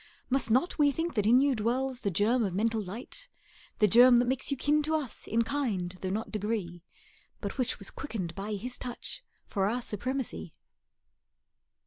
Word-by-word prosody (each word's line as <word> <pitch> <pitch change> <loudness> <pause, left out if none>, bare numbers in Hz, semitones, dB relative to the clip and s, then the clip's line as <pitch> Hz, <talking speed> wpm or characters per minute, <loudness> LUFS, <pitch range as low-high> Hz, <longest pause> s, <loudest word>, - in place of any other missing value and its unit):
Must 265 -2 +2
not 260 +10 +2
we 290 -1 +5
think 325 +4 -2
that 210 -3 +1
in 245 +3 +6
you 280 -1 +3
dwells 250 +3 -1
The 205 - -1
germ 220 +7 +2
of 190 -4 -2
mental 225 +2 +1
light, 230 - -4 0.5
The 210 - +5
germ 245 +4 +8
that 245 - +4
makes 260 +1 0
you 280 - -1
kin 295 +3 +2
to 310 +1 0
us 285 -7 -4
In 230 +2 +2
kind 225 -9 -2
though 185 - -2
not 215 +4 -3
degree, 205 -5 -3 0.6
But - - -5
which 250 -2 0
was 200 - -4
quickened 195 - -5
by 200 +4 -4
His 245 +5 -6
touch 245 -1 -5 0.2
For 195 -2 0
our 245 +2 -2
supremacy? 245 - -4
235 Hz, 180 wpm, -30 LUFS, 205-265 Hz, 0.6 s, germ